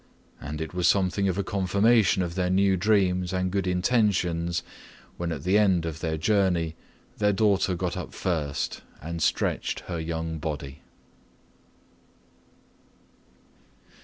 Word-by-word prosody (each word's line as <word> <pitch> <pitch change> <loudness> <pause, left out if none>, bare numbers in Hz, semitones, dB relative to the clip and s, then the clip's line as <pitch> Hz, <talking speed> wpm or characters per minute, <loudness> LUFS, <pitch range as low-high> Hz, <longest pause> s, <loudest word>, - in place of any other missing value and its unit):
And 75 +1 -5
it 80 - -5
was 90 -1 +1
something 95 +1 +2
of 95 -1 -1
a 100 - 0
confirmation 100 +1 +3
of 85 -1 -4
their 90 0 0
new 95 +1 +3
dreams 90 -2 +2
and 95 0 -1
good 95 -1 -1
intentions 90 -4 +1 0.5
when 85 -1 -3
at 75 -4 -5
the 95 +4 +3
end 95 -5 +3
of 80 -1 -4
their 80 -1 -2
journey 90 -3 +1 0.4
their 105 -1 +3
daughter 100 -2 +2
got 90 0 -2
up 90 - -6
first 75 -6 -2 0.2
and 85 +2 -5
stretched - - 0
her 85 -2 -5
young 80 0 -3
body. 75 -2 -5
90 Hz, 135 wpm, -26 LUFS, 85-100 Hz, 0.5 s, confirmation